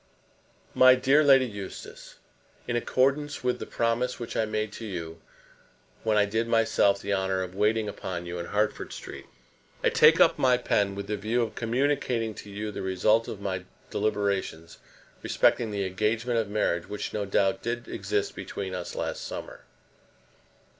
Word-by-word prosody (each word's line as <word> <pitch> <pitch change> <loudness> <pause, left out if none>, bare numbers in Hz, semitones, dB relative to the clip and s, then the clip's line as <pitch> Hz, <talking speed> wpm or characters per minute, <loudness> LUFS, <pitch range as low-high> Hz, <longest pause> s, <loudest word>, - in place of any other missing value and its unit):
MY 130 0 +7
DEAR 135 +4 +4
LADY 135 -2 +6
EUSTACE, 100 -5 -9 0.5
In 120 - -1
accordance 140 +5 +1
with 125 0 0
the - - -6
promise 120 +2 -1
which 120 - -6
I 110 - +2
made 110 0 -2
to 115 - -7
you 85 -4 -6 0.8
when 110 -1 +2
I 105 - +5
did 110 +3 -1
myself 115 -3 +3
the 100 - -2
honour 95 -1 0
of 90 -1 -7
waiting 105 +2 +1
upon 90 -3 -5
you 85 0 -5
in 85 - -5
Hertford 105 +1 -1
Street, - - -9 0.6
I - - +5
take - - +6
up - - +5
my 125 -1 +4
pen 100 -5 0
with 100 - -5
the 105 - -3
view 110 +4 0
of 110 -2 -4
communicating 120 -1 0
to 105 - -10
you 105 +1 -5
the - - -6
result 100 +4 +2
of 100 - -7
my 95 -2 -3 0.3
deliberations 100 -6 -2 0.4
respecting 115 -2 +2
the 100 -2 -2
engagement 110 +5 0
of 110 -3 -2
marriage 90 -5 0
which, 105 0 -4
no 105 - -1
doubt, 95 0 +1
did 120 +1 -3
exist 410 0 -2
between - - -5
us 485 - -5
last - - -3
summer. - - -7
110 Hz, 165 wpm, -27 LUFS, 100-120 Hz, 0.8 s, MY